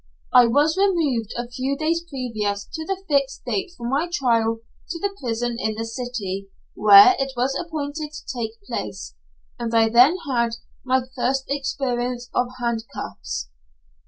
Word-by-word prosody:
I 245 -1 +8
was 295 +7 +3
removed 305 - +1
a 240 0 -3
few 260 +3 -2
days 330 +2 0
previous 225 -9 -3
to 320 - -4
the 385 0 -3
date 280 -2 +3 0.2
fixed 380 -3 -3
for 235 - -5
my 290 +7 0
trial 230 -7 +1 0.3
to 340 - -4
the 395 +1 -2
prison 240 0 -1
in 220 -3 -1
the 225 +1 -3
city 225 -5 -4 0.3
where 205 - +9
it 270 0 -1
was 260 +3 +1
appointed 305 -2 -4
to 305 - -10
take 225 -2 -3
place, 105 - -5 0.5
and 230 -1 -2
I 225 -1 +5
then 250 +10 +6
had 235 -3 +1 0.3
my 260 0 +2
first 265 +1 0
experience 250 -3 -2
of 245 - +2
handcuffs. 230 - -4
250 Hz, 155 wpm, -23 LUFS, 230-290 Hz, 0.5 s, where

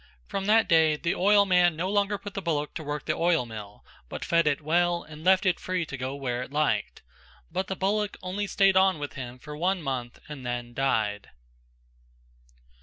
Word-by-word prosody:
From 195 - -4
that 225 +1 +4
day 160 -3 +4
the 170 +3 -1
oilman 185 -3 +4
no 170 +4 -2
longer 205 +1 +1
put 205 -1 -9
the 195 - -4
bullock 150 -4 -2
to 160 - -6
work 145 -1 -4
the - - +1
oil 165 -6 +2
mill 105 -3 -10 0.2
but - - -5
fed 170 -2 +2
it 145 -2 +2
well 170 +3 +1
and 155 0 -12
left 190 +2 +4
it 185 -2 +2
free 185 -2 -2
to 140 - -7
go 130 +1 -4
where 125 -3 -3
it 125 - -7
liked. 150 0 -1 0.5
But 190 - -2
the 190 - -3
bullock 205 +2 -1
only 195 +3 -3
stayed 195 -1 +3
on 190 -2 +4
with 145 -1 -6
him 125 -2 -7
for 150 +3 -9
one 180 +5 0
month 125 -4 -4
and 145 -3 -8
then 120 -1 -4
died. 110 -6 0
165 Hz, 195 wpm, -27 LUFS, 135-190 Hz, 0.5 s, that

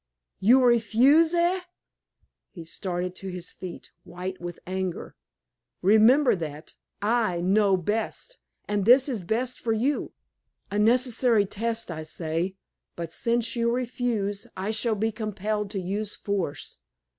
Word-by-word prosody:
"You 250 +6 +5
refuse, 255 +8 +4
eh?" 345 +2 +2 0.9
He 170 -4 -10
started 180 +1 -4
to 195 - -7
his 180 -2 -7
feet, 180 -2 -9
white 185 +1 -7
with 175 -1 -6
anger. 185 -1 -4 0.7
"Remember 220 +8 +5
that 155 -2 -7 0.3
I 220 -5 +1
know 195 +2 +3
best, 220 - -3 0.3
and 205 -2 0
this 255 +4 +7
is 240 -8 -2
best 235 +8 -2
for 225 - 0
you, 255 +7 -1 0.6
a 205 - 0
necessary 235 -1 +3
test, 225 0 -3
I 160 -1 -5
say. 165 +3 -3 0.4
But 170 -1 -6
since 235 +5 0
you 235 0 +1
refuse, 235 -5 -2
I 195 +3 -2
shall 220 +1 0
be 220 +2 0
compelled 210 -1 -3
to 195 - -3
use 200 +3 -3
force." 190 -8 -4
210 Hz, 135 wpm, -26 LUFS, 185-235 Hz, 0.9 s, this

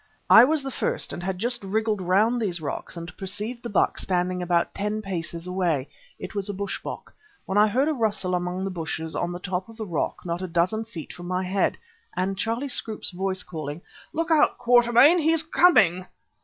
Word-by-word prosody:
I 225 - +10
was 305 +1 +1
the 270 - -4
first, - - -2
and - - -6
had 185 +1 -3
just 240 +3 -1
wriggled 215 +1 -1
round 210 +7 +2
these 180 -5 -1
rocks 155 +3 -5
and 170 +1 -8
perceived 210 +5 -4
the 240 - -6
buck 205 - +1
standing 180 0 -1
about 175 -1 +1
ten 210 +1 -2
paces 170 -3 -5
away 175 -7 -1 0.3
(it - - -8
was 200 -1 -3
a 205 - -3
bush 200 +1 -4
bok), - - -8 0.3
when 190 - -3
I 210 +1 +6
heard 260 +7 +1
a 315 - +1
rustle 210 -7 -1
among 180 +1 -2
the 195 - -2
bushes 160 -2 -4
on 175 - -1
the 175 - -4
top 185 +2 -4
of 225 - -13
the 220 - -4
rock 170 -2 -3
not 170 +1 -3
a 185 - -3
dozen 180 +6 0
feet 170 -9 -9
above 175 0 -9
my 185 +1 -1
head, 190 +2 0 0.4
and 190 +2 0
Charlie 230 +7 -2
Scroope's 220 -6 -1
voice 190 +1 -2
calling: 155 -1 -6 0.3
"Look 330 +1 -2
out, 305 -2 +4
Quatermain! 245 +6 +5
He's 320 0 +4
coming." 210 - +4
195 Hz, 205 wpm, -25 LUFS, 180-225 Hz, 0.4 s, I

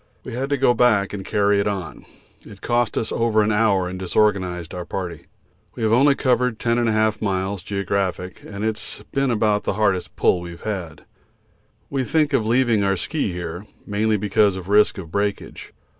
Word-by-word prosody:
We - - -7
had 130 +3 -3
to 140 - +1
go 130 -2 +4
back 110 -5 +2
and 100 -1 -5
carry 100 0 +2
it 100 - 0
on. 95 -4 -5 0.4
It 100 -2 -13
cost 120 -2 0
us 110 - -1
over 115 -2 +2
an 105 - +1
hour 105 -4 +2
and 90 +1 -6
disorganised 95 -3 0
our 90 - -4
party. 85 -2 -6 0.5
We - - -5
have 110 - +2
only 140 +4 +5
covered 125 -3 +1
10 115 +1 0
1/2 110 -2 +1
miles 95 -1 -1
(geo.) 100 +1 -4 0.7
and 100 +1 -4
it's 110 0 -2
been 135 -2 +1
about 105 -3 +1
the - - 0
hardest 95 -3 0
pull 90 - +2
we've 85 -1 -9
had. 90 -8 -5 0.9
We 135 -2 0
think 150 +1 +1
of 115 -5 +1
leaving 120 -3 +2
our 95 -1 +1
ski 125 - -2
here, 85 +2 -6 0.2
mainly 105 +1 +1
because 100 0 +2
of 95 0 -8
risk 105 +1 +4
of 85 -5 -8
breakage. 100 +1 -3
105 Hz, 185 wpm, -22 LUFS, 95-115 Hz, 0.9 s, only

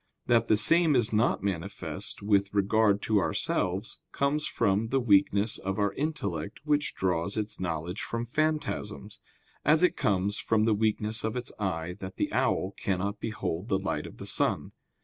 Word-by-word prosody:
That 115 -1 +3
the 110 - +4
same 160 +7 +5
is 120 -3 +2
not 105 -2 +2
manifest 95 0 -4
with 100 -1 +2
regard 100 0 +3
to 110 -2 +2
ourselves, 95 - -1
comes 145 +2 0
from 105 0 +1
the 135 +4 +1
weakness 100 -2 +3
of 95 +1 -3
our 105 -1 +1
intellect 115 - -3
which 150 -1 +1
draws 90 +1 0
its 105 0 -2
knowledge 85 +1 -3
from 115 0 -3
phantasms; 150 -8 -2 0.4
as 155 +4 +4
it 180 - +4
comes 100 0 0
from 110 -1 +1
the 115 - +3
weakness 110 +1 0
of 110 +1 -2
its 125 -1 -3
eye 90 -4 -2
that 95 -1 -7
the - - -2
owl 95 - +1
cannot 100 +2 -2
behold 105 -4 -3
the 95 - +2
light 95 0 -3
of - - -13
the - - -8
sun. - - 0
105 Hz, 170 wpm, -28 LUFS, 95-115 Hz, 0.4 s, same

